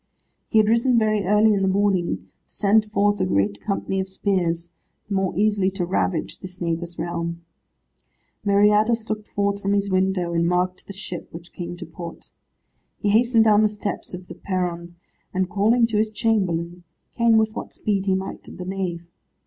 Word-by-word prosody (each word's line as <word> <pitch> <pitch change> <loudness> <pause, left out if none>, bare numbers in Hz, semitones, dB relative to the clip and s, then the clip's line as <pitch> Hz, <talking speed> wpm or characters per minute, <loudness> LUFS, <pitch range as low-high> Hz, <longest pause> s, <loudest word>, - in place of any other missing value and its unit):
He 220 - +2
had 215 -1 +5
risen 235 +2 +3
very 215 -3 +2
early 210 +3 +4
in 200 - +1
the 190 - +2
morning, 190 -2 +1 0.3
to - - -22
send 210 +2 +3
forth 205 0 +2
a - - +3
great 100 +1 0
company 195 -1 -2
of 190 0 -3
spears, 175 -4 -1 0.4
the 205 - -4
more 190 -3 0
easily 205 -2 +2
to 190 -2 -3
ravage 175 -2 -1
this 185 -1 -10
neighbour's 170 0 -3
realm. 170 0 -4 1.0
Meriadus 210 +3 +3
looked 215 0 -4
forth 200 0 -1
from 200 0 0
his 200 -1 0
window, 185 -2 +1
and 170 0 +2
marked 180 +1 -1
the - - -7
ship 185 -2 -6
which 170 +1 -11
came 175 0 -6
to 175 - -7
port. 165 +1 -9 0.7
He 205 - -1
hastened 230 +2 +4
down 215 -1 +5
the 215 - +4
steps 210 -3 -5
of 180 0 -11
the - - -8
perron, 175 -2 -3 0.4
and 185 0 +1
calling 215 +4 +3
to 225 -2 -1
his 220 0 +2
chamberlain, 180 -6 -1 0.3
came 230 -2 +4
with 220 0 +1
what - - -6
speed 200 -2 -2
he 190 - +3
might 190 0 -5
to - - -10
the 180 - -8
nave. 180 -3 -3
195 Hz, 185 wpm, -23 LUFS, 175-210 Hz, 1.0 s, had